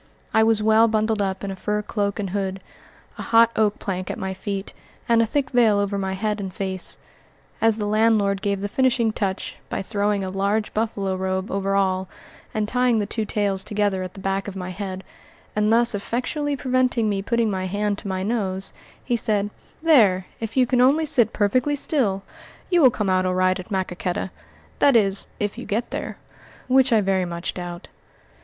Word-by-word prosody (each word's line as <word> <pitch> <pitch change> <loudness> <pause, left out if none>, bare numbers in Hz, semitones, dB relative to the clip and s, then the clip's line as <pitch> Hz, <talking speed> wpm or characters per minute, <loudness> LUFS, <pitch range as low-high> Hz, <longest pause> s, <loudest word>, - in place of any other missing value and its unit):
I 220 - +5
was 220 -1 +3
well 220 +1 +5
bundled 215 -1 +1
up 190 -1 -2
in 200 - -3
a - - -5
fur 210 +2 -2
cloak 205 -1 -2
and 195 -3 -3
hood, 195 -1 -2 0.6
a - - -3
hot 230 0 +5
oak 215 -1 +2
plank 185 -2 -4
at - - -3
my 190 0 -3
feet, 195 +1 -5 0.3
and 230 -1 +4
a 230 - +2
thick 285 +4 -1
veil 230 -5 +4
over 200 0 0
my 190 -1 -2
head 210 +2 -2
and 195 -2 -4
face. 190 -1 -3 0.6
As 225 -1 +3
the 210 - -2
landlord 210 -2 +2
gave 200 -2 -1
the 205 - -1
finishing 250 0 +2
touch, 195 -2 -3
by - - -3
throwing 205 -1 0
a 190 - -3
large 200 +3 0
buffalo 200 -3 -1
robe 190 +1 -2
over 195 0 0
all 190 -1 +1 0.4
and 215 -1 -1
tying 250 0 +2
the 210 - 0
two 220 +1 -3
tails 200 -2 0
together 205 -2 0
at 185 0 -6
the - - -9
back 195 +1 -2
of 200 - -6
my 185 -1 -5
head 190 0 -5 0.5
and 210 0 +2
thus 235 +1 +4
effectually 270 +8 -2
preventing 255 -3 +1
me 200 -2 0
putting 230 +1 +1
my 185 -1 -2
hand 205 +1 -1
to 210 - -8
my 190 -1 -2
nose, 195 -3 -2 0.3
he 245 - 0
said, 210 -3 0 0.3
"There, 210 - +5
if 225 +2 -5
you 255 - +5
can 245 0 +2
only 285 +5 +4
sit 240 -7 +3
perfectly 250 +8 +1
still, 225 -10 0 0.5
you 350 -1 +4
will 265 - +8
come 210 -3 -2
out 185 0 +2
all 185 - 0
right 185 0 +2
at 185 - -9
Maquoketa; 185 -2 -2 0.5
that 280 -3 +5
is, 200 -3 +3
if 205 -1 -2
you - - -8
get 225 +4 -2
there, - - -4 0.5
which 260 0 +4
I 220 -2 +5
very 190 -2 +1
much 170 0 -4
doubt." 175 -1 -7
205 Hz, 200 wpm, -23 LUFS, 190-225 Hz, 0.6 s, will